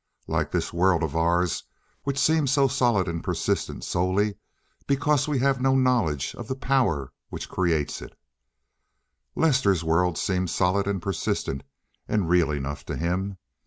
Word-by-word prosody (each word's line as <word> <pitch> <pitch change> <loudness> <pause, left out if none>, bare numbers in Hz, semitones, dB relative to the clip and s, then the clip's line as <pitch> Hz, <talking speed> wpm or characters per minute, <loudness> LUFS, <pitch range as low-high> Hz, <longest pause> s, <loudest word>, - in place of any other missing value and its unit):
Like - - 0
this - - -2
world 85 -1 +3
of 80 -1 -2
ours, 85 +1 +1 0.4
which 140 -1 -1
seems 150 0 +3
so 135 +1 +4
solid 120 -8 +2
and 85 -1 -3
persistent - - -2
solely 95 +4 +1 0.5
because 140 +1 +2
we 150 -2 0
have 135 0 +1
no 135 0 +3
knowledge 120 - +1
of 120 - -6
the 130 - -2
power 125 - 0 0.2
which - - -6
creates 85 -5 0
it, - - -11 1.2
Lester's 125 - +3
world 80 +1 +2
seemed 90 0 0
solid 95 +4 +1
and 100 -3 -2
persistent 80 -7 -2 0.5
and 105 -5 0
real 90 -2 +4
enough 70 -1 -3
to - - -4
him. 95 +4 -2
95 Hz, 150 wpm, -25 LUFS, 85-130 Hz, 1.2 s, so